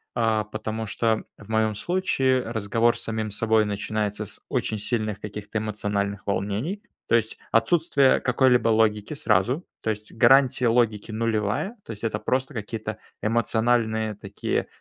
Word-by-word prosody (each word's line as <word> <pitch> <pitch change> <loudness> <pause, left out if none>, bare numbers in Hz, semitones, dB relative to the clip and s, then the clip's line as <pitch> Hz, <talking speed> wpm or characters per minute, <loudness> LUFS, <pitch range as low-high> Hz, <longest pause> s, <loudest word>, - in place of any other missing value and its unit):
А, 110 -3 +1
потому 110 +1 -4
что 110 +2 0
в 105 +1 -15
моём 110 -1 +1
случае 135 - +1
разговор 115 +1 +1
с - - -8
самим 110 -1 -2
собой 110 +1 +2
начинается 105 0 -2
с - - -11
очень 110 -1 -1
сильных 110 -2 -2
каких-то 105 +1 -5
эмоциональных 105 -2 -2
волнений. 105 - -2 0.3
То - - +3
есть 110 -1 0
отсутствие 140 +3 +3
какой-либо 125 -2 +3
логики 110 +2 +2
сразу. 130 - +1 0.2
То - - -2
есть 105 0 -4
гарантия 125 +1 +5
логики 115 -2 +1
нулевая. 110 - -1
То - - -8
есть 105 0 -9
это 110 -2 -1
просто 130 +5 -1
какие-то 110 -1 -5 0.2
эмоциональные 110 -1 +1
такие, 100 0 -3
110 Hz, 140 wpm, -25 LUFS, 105-120 Hz, 0.3 s, гарантия